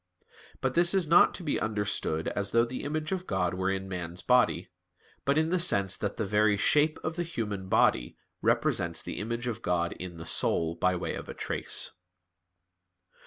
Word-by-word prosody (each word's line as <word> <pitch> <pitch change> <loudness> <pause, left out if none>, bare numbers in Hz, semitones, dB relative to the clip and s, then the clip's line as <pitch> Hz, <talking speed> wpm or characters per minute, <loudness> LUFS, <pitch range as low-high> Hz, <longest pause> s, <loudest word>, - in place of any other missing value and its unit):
But 130 -1 0
this 175 +4 +4
is 190 -3 +3
not 165 +3 +5
to 185 - -5
be 150 - 0
understood 105 -7 -1
as 100 0 -3
though 115 0 +4
the 125 +2 -6
image 155 +3 -3
of 185 -1 -3
God 90 -1 0
were 95 +1 -1
in 95 0 -2
man's 90 -1 -5
body; 125 0 +2 0.5
but 140 +1 +2
in 160 +1 +2
the 180 +1 +1
sense 100 - +2
that 100 -1 -4
the 110 - -1
very 105 +1 +3
shape 150 +8 +3
of 160 +2 -3
the - - 0
human 105 - -4
body - - +2 0.2
represents 85 -1 +1
the - - -5
image 115 +3 -3
of 120 -2 -3
God 85 -1 0
in 90 -1 -8
the 80 - -8
soul 80 0 +1
by 90 +2 +1
way 90 - -3
of - - -7
a - - -6
trace. - - 0
105 Hz, 190 wpm, -29 LUFS, 90-150 Hz, 0.5 s, not